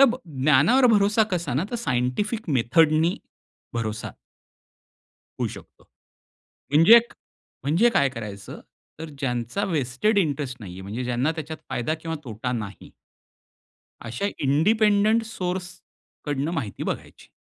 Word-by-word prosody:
तब 260 -3 +6 0.2
ज्ञानावर 155 - +5
भरोसा 210 +1 +4
कसा 170 -7 -2
ना 145 +7 +1
तर 245 - -4
सायंटिफिक 205 - -1
मेथडनी 155 +7 +3 0.6
भरोसा. 110 -1 -3 1.3
होऊ - - +1
शकतो. - - -13 0.9
म्हणजे 165 +11 +8
1 235 0 +2 0.5
म्हणजे 165 - +3
काय 140 -10 +3
करायचं, 105 -6 -8 0.4
तर 160 0 -6
ज्यांचा 125 - -2
व्हेस्टेड 165 - 0
इंटरेस्ट 145 -6 -1
नाहीये, 95 -3 -9
म्हणजे 105 +6 -5
ज्यांना 125 +5 0
त्याच्यात 160 -1 -6
फायदा 120 +6 -1
किंवा 165 0 -4
तोटा 120 +2 -4
नाही. 105 -5 -6 1.1
अशा 120 - -3 0.2
इंडिपेंडंट 210 +9 +3
सोर्स 180 -2 -3 0.6
कडनं 145 +1 -1
माहिती 105 -8 -7
बघायची. - - -6
150 Hz, 115 wpm, -24 LUFS, 125-200 Hz, 1.3 s, म्हणजे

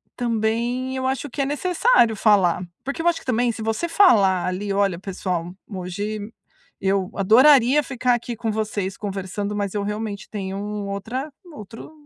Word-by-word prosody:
também 240 +2 -1
eu 260 0 -1
acho 270 +2 -2
que 275 - -3
é 275 - +1
necessário 320 - +2
falar. 195 -5 +3 0.2
Porque 280 +4 -4
eu 345 - 0
acho 340 - +2
que - - -18
também 245 -1 +1
se 225 - -8
você 225 +10 -1
falar 205 - +4
ali: 195 +3 -3
"Olha, 195 -3 +1
pessoal, 180 -3 -4
hoje 205 +3 -5 0.5
eu 190 -1 0
adoraria 255 +6 +5
ficar 255 -2 0
aqui 240 0 -5
com 225 0 -2
vocês 210 -3 -3
conversando, 200 0 -4
mas 200 -1 -2
eu 205 -1 -1
realmente 210 -1 -4
tenho 195 -2 -4 0.3
outra 235 +9 -4 0.2
outro 225 +2 -10
215 Hz, 160 wpm, -22 LUFS, 195-255 Hz, 0.5 s, adoraria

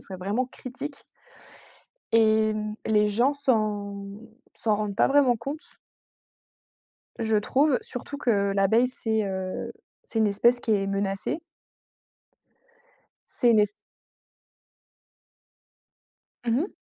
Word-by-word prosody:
serait 190 - -7
vraiment 205 +8 -1
critique 265 +3 -7 1.1
et 220 -1 +4
hem, 215 0 -3
les 210 -1 +3
gens 240 +7 +2
s'en 210 -7 -1 0.5
s'en 215 -2 0
rendent 205 -1 -3
pas - - +4
vraiment 270 -4 +4
compte 285 +8 -7 1.4
je 220 -1 +1
trouve, 265 +6 +2
surtout 270 +3 -7
que 200 -7 +1
l'abeille 220 +5 +3
c'est, 220 -3 0
heu, 190 -1 -4 0.3
c'est 225 - -3
une 215 - +4
espèce 235 +5 +3
qui 230 - -2
est 195 -2 +1
menacée 195 +8 -1 1.9
c'est 240 - +3
une 220 - +5
es 210 -1 +1 2.7
Mmh 240 +3 +1
mh. 375 - -4
220 Hz, 110 wpm, -26 LUFS, 205-250 Hz, 2.7 s, une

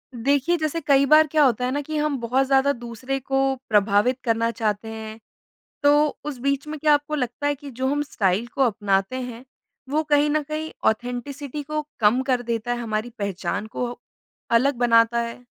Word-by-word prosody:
देखिए 280 +7 +1
जैसे 310 +1 -2
कई 280 -1 +4
बार 310 +2 +6
क्या 305 0 +3
होता 250 -1 +1
है 250 - -1
ना, 290 +2 -1
कि 310 +2 -4
हम 300 -2 0
बहुत 250 +3 +1
ज़्यादा 270 +1 +3
दूसरे 240 +3 -5
को 270 0 0
प्रभावित 210 +4 +3
करना 230 -1 +1
चाहते 215 -1 -2
हैं। 220 0 -8 0.6
तो 295 +1 +5 0.2
उस 295 -4 -4
बीच 280 +3 -1
में 310 - -5
क्या 300 0 +4
आपको 290 +1 0
लगता 255 +1 -2
है 290 - +1
कि 285 0 -10
जो 260 +2 -2
हम 290 +2 0
स्टाइल 205 -4 0
को 275 - -2
अपनाते 205 0 0
हैं 245 -1 -7 0.5
वो 305 +3 +1
कहीं 295 0 +4
न 305 +1 +1
कहीं 310 +2 -5 0.2
ऑथेंटिसिटी 250 +5 -4
को 305 +1 -3 0.2
कम 220 +4 +4
कर 255 -2 +1
देता 235 0 -3
है - - -4
हमारी 220 +1 -2
पहचान 200 +1 -3
को 240 +2 -3 0.6
अलग 255 +4 +3
बनाता 230 -1 +4
है? 235 +1 -7
255 Hz, 190 wpm, -23 LUFS, 230-290 Hz, 0.6 s, बार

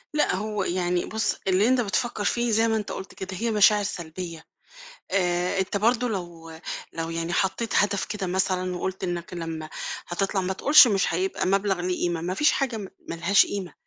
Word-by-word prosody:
لأ، 300 - +2
هو 210 +1 -2
يعني 180 -1 0
بُصّ، 220 0 -1
اللي 190 +3 +3
أنت 255 0 +3
بتفكّر 215 +1 -1
فيه 240 +3 +1
زي 225 +1 +3
ما 225 - +1
أنت 210 - -4
قُلت 190 - -7
كده، 190 0 -6
هي 230 +4 -1
مشاعر 210 0 +5
سلبيّة. 170 -3 -6 0.7
آآ، 180 -1 +1
أنت 190 +2 0
برضه 235 +4 +2
لو 175 -5 -6 0.4
لو 165 0 -4
يعني 165 +1 -3
حطّيت 195 +5 0
هدف 200 -1 +2
كده 200 -3 -4
مثلًا 185 0 0
وقُلت 190 +2 -4
إنك 175 -1 -4
لما 165 -2 -5 0.4
هتطلَع 195 +2 -1
ما 185 +1 -1
تقولش 280 +6 +7
مش 195 -5 +1
هيبقى 185 +2 -1
مبلَغ 195 0 +1
له 180 +1 -1
قيمة، 175 -2 -1
ما 180 +2 -2
فيش 295 +10 +3
حاجة 260 -4 -1
م 200 -3 -6 0.2
ما - - -3
لهاش 175 +4 +4
قيمة، 195 -3 -5
190 Hz, 190 wpm, -25 LUFS, 175-210 Hz, 0.7 s, تقولش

